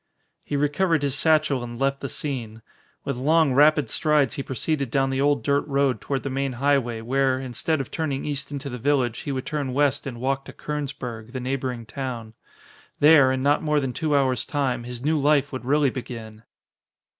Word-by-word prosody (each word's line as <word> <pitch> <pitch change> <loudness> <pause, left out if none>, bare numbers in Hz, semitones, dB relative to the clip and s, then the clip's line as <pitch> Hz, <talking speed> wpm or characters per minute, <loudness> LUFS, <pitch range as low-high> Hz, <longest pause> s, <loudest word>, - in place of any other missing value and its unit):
He 145 - -4
recovered 150 +2 +1
his 140 -2 0
satchel 155 -5 +2
and 120 0 -7
left 135 0 0
the 140 - -4
scene. 115 -7 -5 0.4
With - - -2
long, 155 +2 +3
rapid 150 +2 +5
strides 150 -5 +2
he - - -3
proceeded 140 +1 -2
down 135 +1 +1
the 135 0 0
old 145 0 +2
dirt 140 0 +2
road 140 -2 +1
toward 135 -2 -2
the 140 - -3
main 135 0 -1
highway 125 -3 +1
where, 130 +2 +1
instead 135 +5 -1
of 135 - -5
turning 145 -4 -2
east 145 -1 -3
into 140 0 -5
the 125 -2 -5
village, 130 -3 +1
he 145 - -4
would 130 -1 -3
turn 140 -3 -3
west 140 0 +1
and 120 -3 -6
walk 135 +2 -1
to - - -10
Kernsburg, 125 -6 -5
the 130 - -3
neighboring 125 -2 -3
town. 120 -3 -6 0.7
There, 145 -3 +7
in 130 0 -1
not 145 +1 +3
more 150 -1 +1
than 135 -3 -2
two 155 0 0
hours 130 -2 +1
time, 130 -5 -1
his 125 +1 -7
new 155 0 +2
life 145 -1 +2
would 130 -1 -5
really 145 0 +3
begin! 115 -3 -8
135 Hz, 195 wpm, -24 LUFS, 125-145 Hz, 0.7 s, There